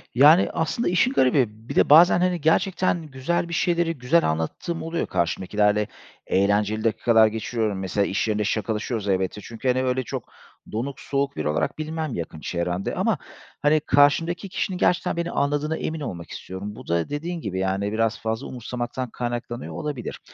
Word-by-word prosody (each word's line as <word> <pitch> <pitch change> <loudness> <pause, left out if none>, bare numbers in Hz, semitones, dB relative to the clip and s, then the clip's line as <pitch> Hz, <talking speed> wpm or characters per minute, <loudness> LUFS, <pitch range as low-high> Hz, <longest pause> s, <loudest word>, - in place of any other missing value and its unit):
Yani, 150 +8 +7
aslında 165 +8 0
işin 180 +8 +3
garibi, 130 - +4 0.2
bir - - -4
de - - +4
bazen, 170 +4 +8
hani, 180 -2 +1
gerçekten 175 +3 +2
güzel 150 +6 -2
bir - - -5
şeyleri 170 -1 +1
güzel 135 - +2
anlattığım 80 - -3
oluyor 165 +1 -2
karşımdakilerle. 105 +4 +1 0.4
Eğlenceli 105 +2 +2
dakikalar 115 0 +4
geçiriyorum. 110 -2 -2
Mesela 95 +2 0
iş 100 - -1
yerinde 105 -1 0
şakalaşıyoruz 110 +1 -2
elbette 95 +1 0
çünkü, 115 +4 -6
hani, 130 +1 +2
öyle 130 0 0
çok - - -5 0.5
donuk 125 +5 -3
soğuk 140 0 -1
biri - - -2
olarak 75 - -1
bilinmem 155 -2 -3
yakın 80 -2 -5
çevremde 90 +3 -2
ama, - - +1 0.4
hani, 150 +1 +4
karşımdaki 165 +7 +2
kişinin 185 0 -2
gerçekten 180 -1 +1
beni 170 0 -2
anladığına 145 +2 0
emin 160 0 -3
olmak 90 - -6
istiyorum. 100 +3 -7
Bu 130 - -12
da 85 0 0
dediğin 165 +4 -4
gibi 95 -6 -3
yani 95 +2 -1
biraz 115 0 0
fazla 110 +3 -3
umursamaktan 125 +1 -4
kaynaklanıyor 120 0 -4
olabilir 150 -6 -5
125 Hz, 160 wpm, -24 LUFS, 105-155 Hz, 0.5 s, bazen